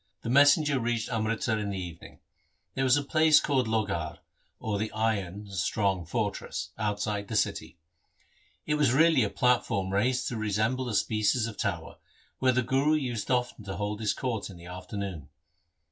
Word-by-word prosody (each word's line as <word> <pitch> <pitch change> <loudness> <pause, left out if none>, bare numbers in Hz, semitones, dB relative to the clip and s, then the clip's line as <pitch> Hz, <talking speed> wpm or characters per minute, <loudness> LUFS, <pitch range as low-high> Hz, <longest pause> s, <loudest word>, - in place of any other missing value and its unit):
The 115 - -2
messenger 145 +1 +5
reached 115 -1 -1
Amritsar 110 0 0
in 105 -1 -3
the 100 - -3
evening. 85 -2 -9 0.5
There 135 - -1
was 130 +1 +4
a 145 - 0
place 155 +1 +5
called 130 -5 +1
Lohgarh, 100 -8 -1 0.4
or 105 -2 -2
the 110 +1 -2
iron 105 -3 -1
(strong) 95 -1 0
fortress, 105 +2 -3
outside 105 -1 -2
the 110 - -4
city. 95 - -1 0.9
It 150 - 0
was 135 -5 +3
really 160 0 +5
a 105 - 0
platform 100 -7 +1
raised 125 +5 +1
to 120 - -4
resemble 110 +4 0
a 110 - -2
species 110 +3 +1
of 115 -2 -5
tower, 90 -8 -3 0.4
where 130 -1 +4
the 130 0 +1
Guru 135 +5 +2
used 120 -8 -2
often 125 -3 0
to 95 0 -5
hold 105 +1 -3
his 110 -2 0
court 115 -6 -3
in 95 - -11
the 85 - -13
afternoon. 90 -4 -6
110 Hz, 170 wpm, -28 LUFS, 100-125 Hz, 0.9 s, messenger